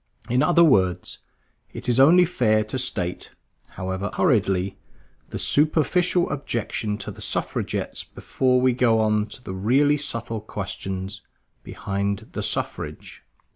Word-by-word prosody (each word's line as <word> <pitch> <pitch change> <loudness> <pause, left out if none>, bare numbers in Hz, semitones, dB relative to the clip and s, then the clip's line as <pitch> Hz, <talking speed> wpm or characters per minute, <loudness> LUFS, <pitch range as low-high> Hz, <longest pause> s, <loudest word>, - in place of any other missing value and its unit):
In 125 +1 +2
other 170 -1 +5
words, 95 - +2 0.5
it - - -6
is 120 +1 +2
only 170 +7 +7
fair 110 -10 +2
to 110 +5 -4
state, 90 -8 -2 0.5
however 95 +2 -3
hurriedly, 100 - +1 0.5
the - - -5
superficial 170 +4 +2
objection 115 -6 -3
to - - -6
the - - -12
Suffragettes - - -2
before 130 -1 0
we 130 0 +3
go 120 -2 +3
on 105 -1 +1
to 110 +4 -11
the 95 - -6
really 135 +10 +3
subtle 115 -6 -3
questions 95 -2 -5 0.4
behind 100 +2 -3
the - - -4
Suffrage. - - -3
110 Hz, 130 wpm, -24 LUFS, 100-135 Hz, 0.5 s, only